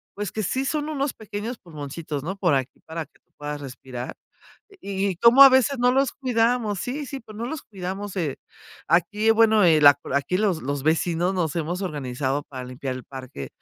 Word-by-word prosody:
pues, 205 -2 -4
que 215 - -3
sí 265 +8 -1
son 300 +1 -1
unos 280 -2 -1
pequeños 215 +3 -6
pulmoncitos, 150 -3 -6
¿no?, 185 +5 -3
por 175 -7 +2
aquí 130 -1 -3
para 160 -1 -5
que - - -30
tú - - -46
puedas 145 0 -5
respirar, 125 -2 -7 0.7
y 200 0 -2
y 185 - -4
como 235 +8 +8
a 275 - +12
veces, 260 +1 +3
no 245 +1 +4
los 270 -1 +2
cuidamos. 230 -5 0
Sí, 275 +3 -4
sí, 270 +1 -6
pues, 215 -2 -13
no 230 +2 -4
los 310 +2 -5
cuidamos. 195 0 -6
Eh, 155 -7 -1 0.5
aquí, 195 +7 +3
bueno, 220 -2 +5
el 155 -4 +5
acu 145 -1 +5
aquí 140 +6 +1
los 195 -6 +1
los 140 +1 -3
vecinos 170 +4 +1
nos 165 -5 -1
hemos 170 +3 -2
organizado 140 -4 -2
para 130 -2 -8
limpiar 130 +1 -5
el 130 - -9
parque. 130 - -8
180 Hz, 200 wpm, -24 LUFS, 145-225 Hz, 0.7 s, a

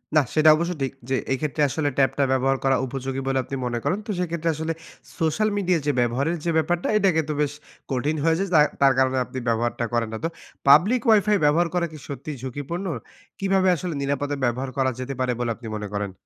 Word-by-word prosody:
নাহ 150 -3 +5
সেটা 155 0 +6
অবশ্য 170 +3 -1
ঠিক। 135 - 0 0.2
যে 135 - +2 0.2
এইক্ষেত্রে 150 +3 -1
আসলে 145 +1 0
ট্যাব 135 -1 +4
টা 140 - +3
ব্যবহার 135 +1 +2
করা 135 0 +3
উপযোগী 135 +1 -4
বলে 135 0 +1
আপনি 135 - -6
মনে 120 -1 -2
করেন। 195 - 0
তো - - -1
সেক্ষেত্রে 170 -2 -1
আসলে 160 +1 -2 0.5
সোশ্যাল 165 +7 +1
মিডিয়া 180 -4 +2
যে 145 - +3
ব্যবহারের 135 +8 +1
যে 170 - +2
ব্যাপারটা 175 +2 0
এটাকে 185 -6 +3
তো - - 0
বেশ 145 -1 0 0.4
কঠিন 135 +4 0
হয়ে 165 0 +3
যায়। 195 -1 -1
যা 155 - +7 0.2
তার 135 -1 +6
কারণে 130 0 +2
আপনি 130 - -6
ব্যবহারটা 120 +1 0
করেন 115 -2 0
না 110 - -2
তো। - - +2 0.4
পাবলিক 195 - +6
ওয়াইফাই 210 -1 +5
ব্যবহার 165 +4 +3
করা 175 -1 +1
কি 155 - -9
সত্যিই 145 0 -6
ঝুঁকিপূর্ণ? 145 +8 -4 0.5
কিভাবে 195 -1 +2
আসলে 175 0 -4
নিরাপদে 145 +1 -1
ব্যবহার 125 +2 -1
করা 135 -1 +2
যেতে 130 +2 -4
পারে 130 -1 +1
বলে 120 -1 -1
আপনি 115 -2 -10
মনে 105 -1 -4
করেন? 100 -1 -2
145 Hz, 210 wpm, -24 LUFS, 130-170 Hz, 0.5 s, যা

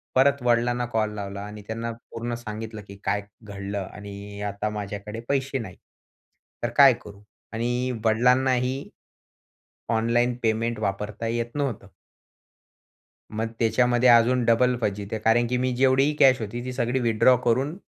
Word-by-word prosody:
परत 140 +1 +4
वडिलांना 120 0 +2
कॉल 110 -3 -1
लावला 100 -1 -5
आणि 105 0 -9
त्यांना 115 +1 -3
पूर्ण 115 +1 -7
सांगितलं, 110 -1 -7
की 100 - -10
काय 105 - 0 0.2
घडलं 100 -1 -5
आणि 100 0 -9
अ, 105 - -2
आता 100 +1 -3
माझ्याकडे 105 +1 -6
पैसे 135 -1 0
नाहीत. 100 -6 -8 0.9
तर 120 - +1
काय 140 -3 +9
करू? 100 -1 -13 0.3
आणि 120 +3 -1
वडिलांनाही 125 +3 +2 1.0
ऑनलाईन 120 +2 +2
पेमेंट 115 +1 0
वापरता 105 +2 -3
येत 115 +2 -3
नव्हतं. 130 -9 -2 1.5
मग 115 0 -2
त्याच्यामध्ये 120 +2 +3
अजून 120 +1 +5
डबल 125 +2 +3
फजिती 105 +1 -2
कारण 120 +2 +4
की 125 +1 0
मी 130 +1 0
जेवढीही 135 +3 +3
कॅश 130 -2 +6
होती, 120 +3 -5
ती 130 - -4
सगळी 125 +1 0
विथड्रॉ 120 +2 +4
करून, 130 +7 +1
115 Hz, 140 wpm, -25 LUFS, 105-125 Hz, 1.5 s, काय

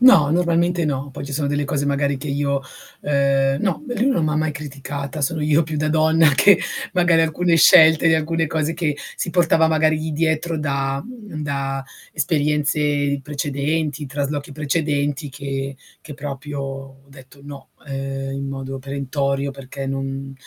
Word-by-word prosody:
No, 195 - +7
normalmente 170 0 +2
no, 140 -1 -2
poi 135 - -7
ci 140 - -7
sono 145 0 -1
delle 145 0 0
cose 145 0 -1
magari 140 0 +1
che 145 +2 -6
io, 140 0 0 0.4
uhm 140 -1 +2
No, 195 - -1
lui 245 0 -1
non 255 - +2
m'ha 155 0 0
mai 155 0 0
criticata. 140 0 -6
Sono 155 +2 0
io 150 +2 +3
più 155 0 -4
da 155 +1 0
donna 160 0 +4
che 200 +7 +6 0.3
magari 170 -2 +4
alcune 165 +2 +2
scelte 160 0 +7
di 160 - +5
alcune 160 +1 0
cose 160 +1 -1
che 150 -4 -1 0.2
si - - -2
portava 170 -2 +3
magari 155 -1 +2
lì 155 0 -3
dietro 160 +1 0
da 140 -2 -1
mhmm, 210 -11 -8
da 135 -1 -2 0.3
esperienze 145 -2 +1
precedenti, 145 +1 -2
traslochi 145 +1 -3
precedenti 145 -1 -1
che 135 0 -5 0.3
che 150 - -9
proprio 145 0 -6
ho 135 0 -7
detto: 135 0 -16
"No", 140 -1 -11 0.2
uhm, 135 0 -4
in 140 0 -4
modo 135 0 -5
perentorio, 140 +1 -2
perché 135 0 -7
non 135 0 -4
145 Hz, 160 wpm, -21 LUFS, 140-160 Hz, 0.4 s, No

